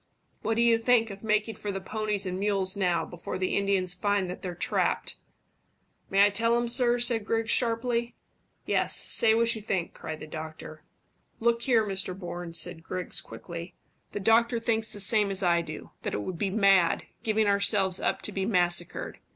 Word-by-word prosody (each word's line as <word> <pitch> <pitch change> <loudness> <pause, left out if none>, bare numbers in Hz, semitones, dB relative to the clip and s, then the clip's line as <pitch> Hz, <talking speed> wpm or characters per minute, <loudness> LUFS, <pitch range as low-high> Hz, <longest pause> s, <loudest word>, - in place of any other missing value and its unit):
"What 225 - -1
do 235 - +2
you 230 -1 +4
think 230 -1 +3
of 195 0 -10
making 215 0 0
for 205 - -4
the 195 - -4
ponies 210 0 -1
and 185 0 -3
mules 195 -2 +1
now, 180 -4 0
before 175 +1 -7
the 185 0 -1
Indians 195 -2 0
find 200 -2 -1
that 180 - -8
they're 180 -2 -5
trapped?" - - -1 0.9
"May 195 +1 +5
I 205 - +2
tell 230 +3 +1
him, 240 0 -1
sir?" 240 0 +3
said 240 -2 +2
Griggs 225 +1 -1
sharply. 235 0 0 0.5
"Yes, - - +1
say 220 -1 +4
what 230 0 +3
you 220 - -7
think," 190 -4 -2
cried 155 -1 -7
the - - -8
doctor. 155 0 -8 0.6
"Look 235 0 +1
here, 235 -4 +3
Mr 190 -2 -1
Bourne," 175 -2 -7
said 165 0 -2
Griggs 180 +2 -2
quickly; 170 0 -9 0.4
"the - - -4
doctor 230 +3 +3
thinks 225 -1 0
the 205 - -2
same 205 +1 +3
as 195 0 -1
I 170 -1 +3
do 170 - -9
that - - -3
it 105 - -3
would 175 - -6
be 200 - 0
mad, 195 -4 +3 0.2
giving 220 -1 +1
ourselves 200 -2 +3
up - - -1
to - - -3
be 195 -1 -2
massacred. 175 -4 0
200 Hz, 190 wpm, -27 LUFS, 180-225 Hz, 0.9 s, May